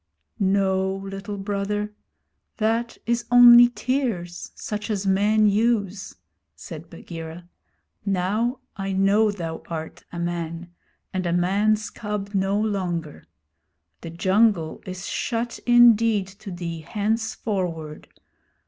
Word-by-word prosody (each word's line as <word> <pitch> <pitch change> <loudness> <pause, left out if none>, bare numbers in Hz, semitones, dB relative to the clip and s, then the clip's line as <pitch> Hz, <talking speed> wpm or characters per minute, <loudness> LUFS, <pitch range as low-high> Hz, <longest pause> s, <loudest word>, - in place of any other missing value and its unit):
'No, 190 -1 +1
Little 195 +1 -6
Brother. 205 +1 -2 0.6
That 230 +1 0
is 235 0 0
only 240 0 +9
tears 235 -10 -2
such 210 +1 -5
as 205 -2 -1
men 205 +3 +3
use,' 205 -2 0 0.4
said - - -9
Bagheera. 165 +1 -9 0.6
'Now 205 +6 0
I 195 0 -3
know 200 +3 +3
thou 165 -5 -5
art 160 -1 -6
a 175 - -7
man, 170 0 -4 0.4
and 185 -1 -1
a - - 0
man's 205 +5 +1
cub 210 -2 -5
no 195 +1 +1
longer. 180 -7 -3 0.7
The 165 - -7
jungle 185 0 +2
is 185 +1 -6
shut 235 0 -2
indeed 230 -4 +5
to 195 +2 -11
thee 175 -2 -5
henceforward. 190 -4 -3
200 Hz, 110 wpm, -24 LUFS, 180-215 Hz, 0.7 s, only